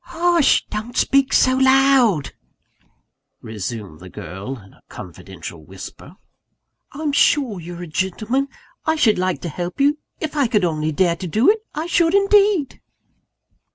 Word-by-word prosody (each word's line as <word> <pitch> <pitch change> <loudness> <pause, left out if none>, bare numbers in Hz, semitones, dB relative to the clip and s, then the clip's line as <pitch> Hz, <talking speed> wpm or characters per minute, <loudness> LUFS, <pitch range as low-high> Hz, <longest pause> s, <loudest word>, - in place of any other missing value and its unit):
"Hush! 340 -3 +2
don't 220 +3 -5
speak 275 -1 +2
so 255 0 +4
loud," 265 - +3 1.1
resumed 105 -5 -7
the 95 - -11
girl 95 +11 -7
in 95 -4 -17
a - - -24
confidential 85 -2 -10
whisper. 95 - -11 0.8
"I'm 300 +1 -3
sure 270 -7 +2
you're 175 +1 -8
a - - -7
gentleman. 215 - -1 0.4
I 315 - +1
should 225 -11 +3
like 185 0 -1
to 170 - -4
help 175 - -6
you 290 +2 +2 0.2
if 315 -1 -4
I 285 -4 +2
could 210 -5 +1
only 155 -2 -1
dare 170 +2 +1
to 185 - -6
do 220 - +4
it, 440 - -2 0.2
I 310 +2 -3
should 340 +1 +2
indeed!" 400 -6 +3
215 Hz, 150 wpm, -20 LUFS, -, 1.1 s, so